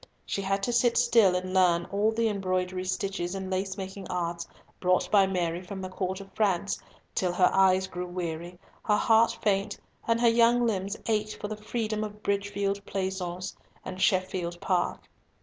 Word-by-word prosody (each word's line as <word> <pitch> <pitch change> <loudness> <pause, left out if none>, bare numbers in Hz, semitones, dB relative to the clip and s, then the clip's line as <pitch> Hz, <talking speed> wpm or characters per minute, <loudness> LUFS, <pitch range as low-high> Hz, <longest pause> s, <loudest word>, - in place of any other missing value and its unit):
She 195 - -2
had 195 +1 -1
to 240 - 0
sit 240 0 +3
still 230 -6 +5
and 185 0 -3
learn 175 -2 +4
all 205 +2 +2
the 225 0 +1
embroidery 185 -2 -1
stitches 185 -1 -2
and 190 -1 -5
lace 190 +1 -2
making 190 0 -6
arts 170 -1 -2 0.3
brought 185 0 +1
by 200 -2 +6
Mary 175 -2 -1
from 190 +1 -7
the 185 -1 -5
Court 185 0 -3
of 195 0 -11
France, 200 -2 0 0.3
till 180 -2 0
her 180 +1 +3
eyes 190 0 +4
grew 180 -1 -5
weary, 175 -1 -5 0.3
her 210 -1 +3
heart 225 0 +4
faint, 195 -2 +1 0.3
and 230 0 +2
her 240 - +4
young 235 +1 +4
limbs 200 -2 -1
ached 215 -1 -1
for 205 - -4
the 215 - -3
freedom 215 0 -2
of 210 0 -7
Bridgefield 200 0 -1
Pleasaunce 190 -2 -3 0.3
and 185 0 -6
Sheffield 185 -2 +1
Park. 180 -1 -1
195 Hz, 175 wpm, -28 LUFS, 185-210 Hz, 0.3 s, by